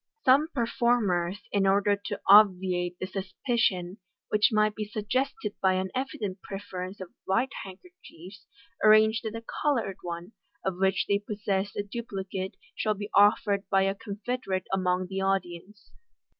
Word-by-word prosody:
Some 275 Hz, +4 st, +5 dB
performers, 230 Hz, -, +1 dB
in 195 Hz, -1 st, +2 dB
order 200 Hz, +1 st, +3 dB
to 200 Hz, -, -6 dB
obviate 185 Hz, -3 st, +5 dB
the -, -, -4 dB
suspicion 190 Hz, -1 st, -1 dB, 0.3 s
which 210 Hz, 0 st, +4 dB
might 215 Hz, -1 st, +3 dB
be 215 Hz, -, -4 dB
suggested 215 Hz, +2 st, -2 dB
by 190 Hz, -1 st, +4 dB
an 185 Hz, 0 st, -2 dB
evident 240 Hz, -8 st, -4 dB
prefer 195 Hz, -2 st, -6 dB
ence 190 Hz, +2 st, -10 dB
of 185 Hz, -2 st, -8 dB
white 235 Hz, +8 st, +1 dB
handkerchiefs, 190 Hz, -, -13 dB, 0.4 s
arrange 215 Hz, +1 st, +6 dB
that 220 Hz, 0 st, -5 dB
a 230 Hz, -, -6 dB, 0.2 s
coloured 235 Hz, -10 st, 0 dB
one, 175 Hz, +2 st, -6 dB, 0.3 s
of 190 Hz, -1 st, -2 dB
which 190 Hz, 0 st, +2 dB
they 200 Hz, 0 st, +1 dB
possess 205 Hz, -1 st, -2 dB
a 205 Hz, -, -1 dB
duplicate, 195 Hz, -3 st, -5 dB, 0.2 s
shall 215 Hz, -1 st, 0 dB
be 205 Hz, +1 st, -7 dB
offered 205 Hz, -1 st, +3 dB
by 195 Hz, -1 st, +3 dB
a 195 Hz, 0 st, +1 dB
confederate 205 Hz, -1 st, -4 dB
among 185 Hz, -1 st, +1 dB
the 190 Hz, +1 st, -4 dB
audience. 190 Hz, +1 st, -3 dB
200 Hz, 145 wpm, -28 LUFS, 190-215 Hz, 0.4 s, arrange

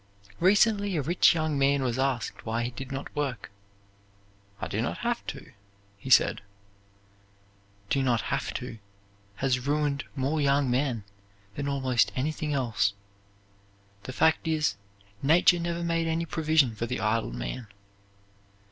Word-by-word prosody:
Recently 205 Hz, +1 st, +3 dB
a 145 Hz, -, 0 dB
rich 175 Hz, +3 st, +4 dB
young 155 Hz, -3 st, 0 dB
man 140 Hz, 0 st, +3 dB
was 125 Hz, 0 st, -1 dB
asked 130 Hz, -5 st, -1 dB
why 115 Hz, +1 st, -1 dB
he 120 Hz, -, -3 dB
did 135 Hz, +2 st, -8 dB
not 135 Hz, 0 st, -6 dB
work. 135 Hz, -9 st, -3 dB, 1.1 s
"I -, -, -3 dB
do 110 Hz, -, -2 dB
not 120 Hz, -, -2 dB
have 240 Hz, 0 st, 0 dB
to," -, -, -7 dB, 0.4 s
he 100 Hz, +7 st, -9 dB
said. -, -, +5 dB, 1.5 s
"Do 140 Hz, -, +2 dB
not 120 Hz, -4 st, +2 dB
have 135 Hz, -, -1 dB
to" 120 Hz, -3 st, -6 dB, 0.6 s
has 125 Hz, +2 st, -1 dB
ruined 145 Hz, -1 st, 0 dB
more 145 Hz, +3 st, 0 dB
young 140 Hz, -2 st, +2 dB
men 125 Hz, -4 st, 0 dB, 0.5 s
than 140 Hz, +4 st, -4 dB
almost 130 Hz, -6 st, +1 dB
anything 150 Hz, +3 st, -2 dB
else. 120 Hz, -7 st, +1 dB, 1.1 s
The 130 Hz, -, -7 dB
fact 160 Hz, +5 st, +2 dB
is, 155 Hz, -8 st, +1 dB, 0.5 s
Nature 170 Hz, +4 st, +5 dB
never 170 Hz, 0 st, -2 dB
made 165 Hz, -1 st, 0 dB
any 165 Hz, +1 st, 0 dB
provision 155 Hz, -6 st, +2 dB
for 115 Hz, +2 st, -4 dB
the 125 Hz, -, -3 dB
idle 110 Hz, -, 0 dB
man. -, -, -5 dB
140 Hz, 140 wpm, -28 LUFS, 125-155 Hz, 1.5 s, said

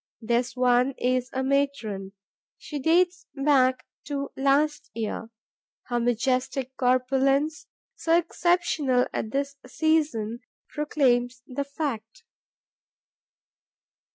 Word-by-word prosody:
This 240 Hz, +3 st, 0 dB
one 250 Hz, +1 st, +3 dB
is 250 Hz, 0 st, 0 dB
a 260 Hz, -, -2 dB
matron; 265 Hz, -8 st, -1 dB, 0.4 s
she 295 Hz, -, -6 dB
dates 355 Hz, +5 st, +2 dB
back 270 Hz, -2 st, +3 dB, 0.2 s
to 280 Hz, -1 st, -3 dB
last 280 Hz, +2 st, +1 dB
year; 225 Hz, 0 st, -4 dB, 0.6 s
her 240 Hz, -1 st, +1 dB
majestic 255 Hz, +2 st, 0 dB
corpulence, 270 Hz, +4 st, +1 dB, 0.3 s
so 330 Hz, 0 st, +2 dB
exceptional 335 Hz, -7 st, +1 dB
at 220 Hz, -, -2 dB
this 280 Hz, +3 st, -2 dB
season, 260 Hz, -7 st, 0 dB, 0.3 s
proclaims 255 Hz, -5 st, 0 dB
the 275 Hz, +2 st, -3 dB
fact. 280 Hz, -, -5 dB
265 Hz, 95 wpm, -26 LUFS, 245-295 Hz, 0.6 s, one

